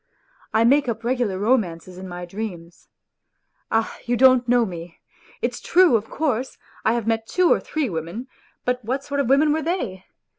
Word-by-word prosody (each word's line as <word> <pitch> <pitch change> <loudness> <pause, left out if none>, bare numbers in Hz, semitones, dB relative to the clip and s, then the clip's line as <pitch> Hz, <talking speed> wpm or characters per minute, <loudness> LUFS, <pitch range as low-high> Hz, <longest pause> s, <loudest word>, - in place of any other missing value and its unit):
I 220 - +3
make 270 +2 +4
up 225 0 -3
regular 240 -5 0
romances 185 -5 0
in 190 - -7
my 175 0 -6
dreams. 175 -3 -7 0.8
Ah, 225 0 0
you 240 0 0
don't 255 -1 +5
know 245 -1 +4
me! 170 -3 -8 0.5
It's - - -2
true, 355 -7 +5
of 220 0 -1
course, 265 -5 -2 0.3
I 225 - +3
have 235 -2 -1
met 225 0 0
two 365 -2 +4
or - - 0
three 310 -2 -2
8 - - -2
women, 170 - -5 0.4
but 250 0 -1
what 260 +5 -2
sort 285 0 -3
of 270 -4 0
women 295 +2 +4
were 315 - 0
they 250 - -3
235 Hz, 185 wpm, -23 LUFS, 190-265 Hz, 0.8 s, don't